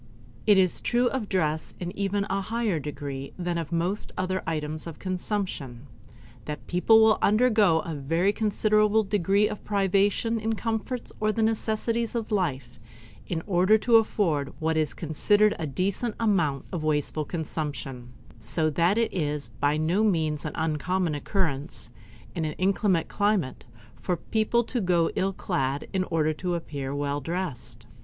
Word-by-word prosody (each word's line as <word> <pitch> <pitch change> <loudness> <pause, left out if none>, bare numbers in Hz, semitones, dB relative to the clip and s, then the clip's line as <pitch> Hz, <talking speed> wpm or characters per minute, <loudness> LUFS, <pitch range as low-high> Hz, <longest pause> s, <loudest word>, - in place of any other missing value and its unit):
It 205 -2 +7
is 185 -2 +3
true 245 +1 +2
of 240 -6 -3
dress 160 -4 -1
in 180 +2 -5
even 200 0 0
a 195 +1 -1
higher 220 -4 -1
degree 140 -2 -6
than 175 -1 -2
of 165 -1 -5
most 175 +5 -1
other 185 0 -1
items 155 0 -2
of 165 - -7
consumption, 180 - -3 0.6
that 150 - -6
people 220 +5 +5
will 220 -1 +4
undergo 215 -6 +4
a 165 - -5
very 165 +7 +1
considerable 215 0 +2
degree 200 +1 +2
of 210 -1 -6
privation 200 +3 +1
in 220 +1 -2
the 225 - +1
comforts 225 +3 -3
or 215 0 +2
the 225 +1 0
necessaries 225 +1 0
of 230 -1 -3
life 135 - -2 0.5
in 165 -2 -3
order 190 +2 +4
to 230 +1 +5
afford 165 -10 +1
what 160 0 0
is 155 -2 +1
considered 205 +7 +3
a 160 - -2
decent 195 - -1
amount 170 -11 +1
of 175 -5 -3
wasteful 155 0 0
consumption; 145 -6 -5 0.3
so 155 +8 0
that 170 +7 +2
it 230 -1 +1
is 150 -7 -2
by 145 +2 +2
no 170 +7 +1
means 160 -8 +1
an 150 - -3
uncommon 160 +2 0
occurrence, 145 - -2 0.4
in 165 - -2
an 155 -1 -2
inclement 190 -1 +1
climate, 205 -10 0 0.3
for 180 -2 -2
people 220 +5 +1
to 240 +1 -2
go 175 -3 +2
ill 195 +1 +1
clad 135 -6 -2
in 185 -1 +1
order 155 -3 +1
to 175 +3 -2
appear 140 -5 -5
well 145 0 -2
dressed. 140 -8 -5
180 Hz, 160 wpm, -26 LUFS, 155-210 Hz, 0.6 s, It